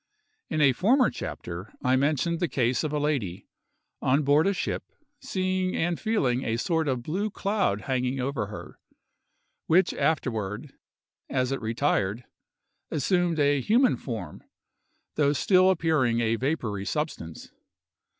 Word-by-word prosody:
In 155 - 0
a 140 -3 +5
former 245 - +3
chapter, 90 +4 -7
I 130 +1 +3
mentioned 150 +5 +1
the 175 - +1
case 125 -2 0
of 155 - -2
a 150 - -1
lady, 135 - -2 0.6
on 135 +4 +2
board 145 +5 +4
a 200 - +2
ship, - - -2 0.4
seeing 185 -1 -1
and 170 0 0
feeling 135 - 0
a 115 0 -1
sort 160 +5 0
of 130 -3 -1
blue 190 - -2
cloud 200 - 0
hanging 130 0 -1
over 130 -4 -2
her, 105 - -10 0.9
which 180 +4 +4
afterward, 115 -4 -2 0.6
as 130 -1 0
it 135 - -2
retired, 115 -2 0 0.7
assumed 175 +2 +1
a 145 -2 +3
human 240 - +3
form, 110 - -6 0.8
though 145 -1 +3
still 185 +5 +4
appearing 155 -10 +2
a 115 -1 +1
vapory 115 -6 -2
substance. 150 - -4
145 Hz, 135 wpm, -27 LUFS, 120-170 Hz, 0.9 s, a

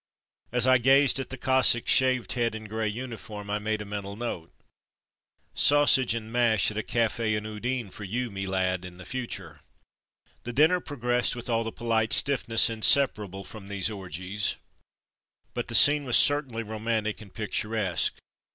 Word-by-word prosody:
As 125 0 +3
I 130 -1 +5
gazed 135 +2 +4
at 135 - -5
the 130 - -6
Cossack's 130 -2 +3
shaved 130 -2 +2
head 115 -2 0
and 110 0 -8
grey 110 +1 -2
uniform, 105 -3 -7
I 105 - 0
made 110 0 -2
a - - -12
mental 100 -1 -6
note, 105 -8 -5 0.6
" - - -47
Sausage 140 -5 +4
and 110 -1 -6
mash 115 -4 +2
at 105 - -8
a - - 0
cafe 115 -1 0
in 105 0 -4
Udine, 110 0 -3
for 105 - -9
you, 120 +4 -3
me 95 0 -5
lad, 95 -1 -1
in 90 -1 -10
the 95 - -11
future. 95 - -6 0.4
'' - - -39
The 120 - -6
dinner 155 +7 +4
progressed 125 -6 -1
with 120 0 -5
all 115 0 +1
the 115 - -4
polite 110 -2 0
stiffness 125 -5 +3
inseparable 110 -4 +1
from 105 -2 -11
these 100 +1 -1
orgies, 95 +1 -3 1.0
but - - -4
the - - -3
scene 145 0 +6
was 125 -3 +3
certainly 135 -6 +1
romantic 110 0 -3
and 100 -3 -13
pic 105 -2 -6
turesque. 105 -7 0
110 Hz, 175 wpm, -27 LUFS, 105-125 Hz, 1.0 s, scene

